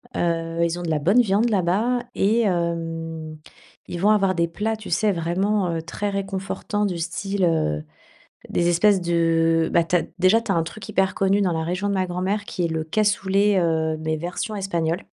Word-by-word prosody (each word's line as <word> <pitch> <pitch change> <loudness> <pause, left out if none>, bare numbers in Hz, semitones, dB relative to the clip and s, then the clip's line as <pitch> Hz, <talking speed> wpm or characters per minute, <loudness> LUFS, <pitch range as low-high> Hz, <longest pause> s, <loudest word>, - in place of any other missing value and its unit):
Heu, 165 -1 -1
ils 170 0 0
ont - - -5
de 170 - -3
la 155 -2 +1
bonne 195 +11 +4
viande 215 +1 +2
là-bas 210 +5 +1
et 220 +4 +2
hem, 165 -4 -2 0.5
ils 175 - -5
vont 205 - +4
avoir 195 -3 +2
des 170 0 +1
plats, 210 +6 -2
tu 215 - -10
sais, 205 +5 +2
vraiment, 185 +3 0
heu, 165 -1 -2
très 185 +5 -4
réconfortants, 195 +1 -3
du 180 -4 -2
style, 190 +3 -2
heu, 75 - 0 0.7
des 175 - +1
espèces 190 +3 +4
de 165 -1 +2
bah, 170 -1 +4
tu 175 +2 +1
as, 175 - +2 0.2
déjà 185 +5 +4
tu 230 -3 -2
as - - 0
un 165 - +2
truc 195 +5 -9
hyper 190 0 +1
connu 195 +1 +2
dans 185 -3 +1
la 160 -1 -1
région 185 +4 -2
de 200 - 0
ma 185 -1 0
grand-mère, 185 +4 -2
qui 180 - -3
est - - +1
le 160 -1 -2
cassoulet, 200 +2 +2
heu, 160 -2 0
mais, 155 0 -2
version 175 +7 -4
espagnole. 170 -4 -2
180 Hz, 200 wpm, -23 LUFS, 165-200 Hz, 0.7 s, bonne